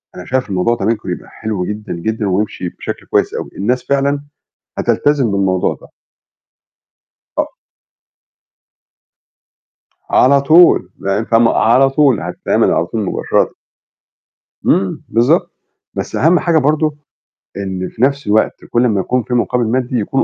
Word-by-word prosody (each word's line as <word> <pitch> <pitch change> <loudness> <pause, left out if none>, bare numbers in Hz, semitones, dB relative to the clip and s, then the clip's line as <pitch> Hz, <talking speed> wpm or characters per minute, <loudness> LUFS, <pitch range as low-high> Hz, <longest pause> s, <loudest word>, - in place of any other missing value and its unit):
أنا 90 - -8
شايف 130 -3 -1
الموضوع 95 +5 +1
ده 100 - -4
ممكن 110 -4 -1
يبقى - - -7
حلو 105 -5 -4
جدًا، 105 -2 -5
جدًا، 110 +4 -2
ويمشي 95 -2 -2
بشكل - - -7
كويس - - 0
أوي، - - -5
الناس 125 +5 0
فعلًا 140 +1 0 0.5
هتلتزم 140 -7 +1
بالموضوع 95 -2 +1
ده. - - -14 1.5
آه. - - -2 2.5
على 140 +2 +5
طول، 155 - +5
لأن 100 +3 -1
فاهمة؟ 115 0 +3
على 130 +4 +4
طول، 135 -5 +3
هتتعمل - - 0
على - - +1
طول - - -3
مباشرةً. - - 0 1.2
امم، 95 0 +1
بالضبط، 115 +2 +2 0.4
بس - - -4
أهم 170 +3 +4
حاجة 165 -2 +2
برضه 150 +1 +1 0.6
إن 95 -2 -4
في 110 - -10
نفس 140 -1 +1
الوقت 110 +1 +1
كلّ 120 +1 +1
أما 105 -5 +1
يكون 125 +5 0
في 125 - -5
مقابل 120 0 +1
مادي، 125 0 -1
يكون 135 +6 0
120 Hz, 135 wpm, -16 LUFS, 100-135 Hz, 2.5 s, على